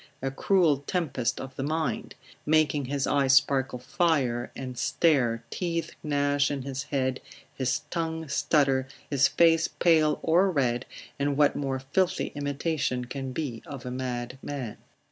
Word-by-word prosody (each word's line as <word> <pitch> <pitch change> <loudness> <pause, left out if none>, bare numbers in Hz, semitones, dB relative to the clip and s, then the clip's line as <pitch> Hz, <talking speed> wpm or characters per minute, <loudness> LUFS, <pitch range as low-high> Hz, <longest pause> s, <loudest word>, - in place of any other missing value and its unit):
a 135 0 -2
cruel 165 0 +3
tempest 155 -10 -1
of 130 0 -7
the - - -2
mind; 155 +2 -2 0.3
making 150 -2 +2
his 140 +1 -1
eye 140 -2 +2
sparkle 135 -1 +3
fire, 125 -3 0
and 130 -1 -6
stare, 130 -4 +2
teeth 170 -2 -2
gnash 145 -1 +1
in 140 -2 -3
his 135 0 -4
head, 130 -3 -1 0.3
his 130 -3 -1
tongue 160 -1 -2
stutter, 140 -2 +2 0.2
his 135 -1 +5
face 165 +1 +4
pale, 155 -3 +3
or 175 +4 +4
red, 130 -7 0 0.3
and 140 0 0
what 145 -1 +4
more 135 -2 -1
filthy 140 +8 0
imitation 145 -3 -1
can 135 +1 -5
be 130 -5 -4
of 140 -5 -8
a 125 - -4
mad 125 0 -4
man? 130 -7 -5
140 Hz, 145 wpm, -27 LUFS, 130-155 Hz, 0.3 s, his